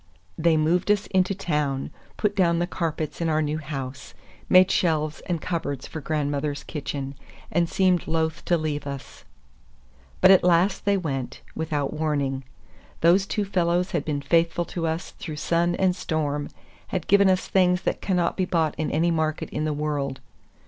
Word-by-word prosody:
They 160 0 +3
moved 170 +5 +1
us 210 -1 +3
into 190 +1 +2
town, 150 -7 -1 0.3
put 210 -1 0
down 170 -3 +3
the 175 - +1
carpets 165 -3 -3
in 165 - +1
our 155 0 +2
new 150 +1 -1
house, 135 -2 -6 0.3
made 185 0 +6
shelves 155 -3 +1
and 175 -2 -1
cupboards 155 -6 -3
for 155 - -7
grandmother's 145 -1 -2
kitchen, 140 -2 -5 0.4
and 170 +1 +1
seemed 185 -2 +2
loath 160 0 -1
to 175 - +3
leave 150 -2 -3
us. 140 -1 -8 0.9
But 185 - +7
at 190 - +6
last 180 +2 +3
they 200 0 +3
went, 135 -8 -4
without 150 -3 -2
warning. 145 -4 -1 0.6
Those 185 +4 +4
two 210 -2 -1
fellows 180 -1 +1
had 170 -6 0
been 145 -2 -2
faithful 170 +3 +2
to 165 -2 -1
us 160 +3 -3
through 155 -3 -5
sun 170 +3 +1
and 185 -1 +2
storm, 150 -4 -2 0.4
had 185 -4 -3
given 200 0 +5
us 185 -1 +1
things 180 -1 +3
that - - -1
cannot 180 -3 +1
be 185 - 0
bought 165 -4 +1
in 155 - 0
any 165 +3 +2
market 155 -1 -1
in 150 - -2
the 155 - 0
world. 145 -3 -2
160 Hz, 170 wpm, -25 LUFS, 150-180 Hz, 0.9 s, But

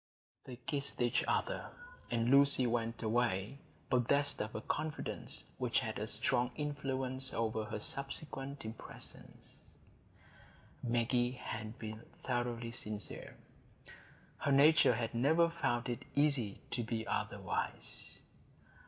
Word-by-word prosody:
They 125 - -7
kissed 140 +3 -3
each 120 -1 +3
other, - - 0 0.4
and 115 +1 +2
Lucy 140 -1 +6
went 115 -1 0
away, 110 +1 +1 0.3
possessed 140 +3 +3
of 105 +1 -4
a 110 - -2
confidence 155 +5 -2
which - - +2
had - - -3
a - - -2
strong 120 0 +2
influence 135 -3 -1
over 110 -1 0
her 105 - -4
subsequent 140 +1 -3
impressions. 110 0 -9 1.2
Maggie 120 +1 +2
had 110 -3 -5
been 110 0 -6 0.2
thoroughly 120 -2 -1
sincere; 105 -3 -5 1.0
her 140 - +1
nature 140 -2 +7
had 115 0 -2
never 160 +8 +4
found 130 -7 0
it 120 -2 -3
easy 140 -8 +2
to 120 - 0
be 110 0 -2
otherwise. - - -2
120 Hz, 115 wpm, -35 LUFS, 115-140 Hz, 1.2 s, nature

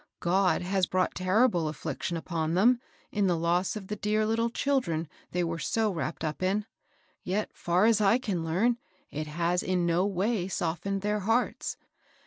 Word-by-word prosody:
Ood 185 +1 +3
has 190 0 +1
brought 185 0 +1
terrible 185 -2 +2
affliction 165 +2 -3
upon 165 -1 -2
them, 240 +6 +4 0.3
in 205 -2 +1
the 175 -2 +2
loss 175 +4 +1
of 210 -3 -6
the 210 - -4
dear 210 +1 +1
little 230 +2 +1
children 230 - 0 0.2
they 180 0 0
were 165 0 -2
so 220 +7 +1
wrapped 165 -2 -4
up 155 +1 -3
in; 195 +3 +1 0.6
yet, 205 +4 -2
far 175 +4 +2
as 220 -1 +4
I 205 +3 +5
can 200 -10 -2
learn, 215 +9 +1 0.3
it 155 +1 -4
has 170 +3 0
in 180 -2 0
no 170 +3 +2
way 195 0 0
softened 185 +2 -2
their 210 0 +1
hearts. 225 +5 0
185 Hz, 170 wpm, -29 LUFS, 170-210 Hz, 0.6 s, I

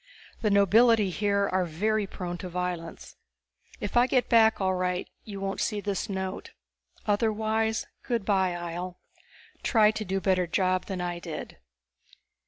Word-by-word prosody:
The 215 - +2
nobility 210 +1 +5
here 200 +1 +1
are 185 0 +3
very 205 +5 0
prone 175 -2 -5
to 185 - -6
violence. 175 -2 -5 0.6
If - - -4
I 240 +1 +5
get 255 -1 +1
back 225 -1 +5
all 190 -1 +1
right 180 0 -1 0.2
you 200 -2 -7
won't 195 0 -3
see 210 -2 0
this 200 +1 -3
note. 190 -1 -4 0.5
Otherwise 220 +1 +1 0.2
good 235 -5 -2
by, 190 -3 +2
Ihjel. 175 +1 -5 0.7
Try 215 -3 +4
to 220 0 -4
do 195 -1 -2
a - - +1
better 185 -2 +1
job 185 +1 +1
than 190 -2 -3
I 175 -1 -3
did. 170 -2 -7
195 Hz, 155 wpm, -28 LUFS, 180-215 Hz, 0.7 s, nobility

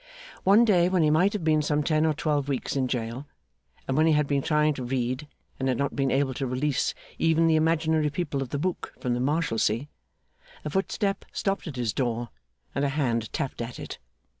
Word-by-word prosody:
One 205 +5 +6
day 180 -5 +4
when 185 -3 +2
he 150 - +4
might 180 +6 +3
have 205 -5 -3
been 155 -1 +3
some 150 0 0
ten 155 0 +2
or 155 - +2
twelve 145 -2 0
weeks 135 0 -2
in 130 -2 +1
jail, 125 +2 -3 0.6
and 135 - 0
when 155 +2 +4
he 160 - +5
had 150 0 +3
been 140 -1 0
trying 150 +1 +2
to 130 - -6
read 130 +3 -2 0.3
and 130 - -1
had 125 - +1
not 140 0 -1
been 135 -1 +1
able 135 0 +1
to 135 - 0
release 130 +2 0 0.2
even 165 0 +3
the 165 -1 +4
imaginary 160 -1 +2
people 145 -3 -2
of 135 - -4
the 145 - -2
book 180 +5 -3
from 125 - -1
the 120 - -1
Marshalsea, 135 -3 0 0.8
a - - -1
footstep 195 +2 -1
stopped 195 -2 -2
at 150 - -6
his 120 -4 -1
door, 120 -2 -1 0.4
and 140 - -1
a 140 - +2
hand 120 -6 -1
tapped 135 - -3
at 120 +1 -5
it. - - -7
145 Hz, 215 wpm, -26 LUFS, 130-160 Hz, 0.8 s, One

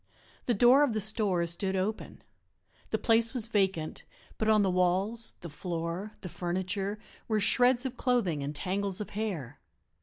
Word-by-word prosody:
The 240 - +2
door 245 +6 +6
of 285 -6 +2
the 215 - -1
store 200 -4 +3
stood 190 +3 -1
open; 195 +4 -3 0.7
the - - 0
place 230 +2 +2
was 235 -4 0
vacant, 190 -8 -1 0.4
but 220 - 0
on 215 -1 +4
the 190 - +1
walls, 190 +6 +2
the 175 - -7
floor, 170 +5 -5
the 185 - -6
furniture, 190 +4 -3 0.3
were 220 -1 +1
shreds 245 +4 +3
of 255 -1 -4
clothing 210 - 0
and 145 +2 -4
tangles 195 +3 -2
of 210 - -6
hair. 175 - -4
200 Hz, 160 wpm, -29 LUFS, 180-225 Hz, 0.7 s, door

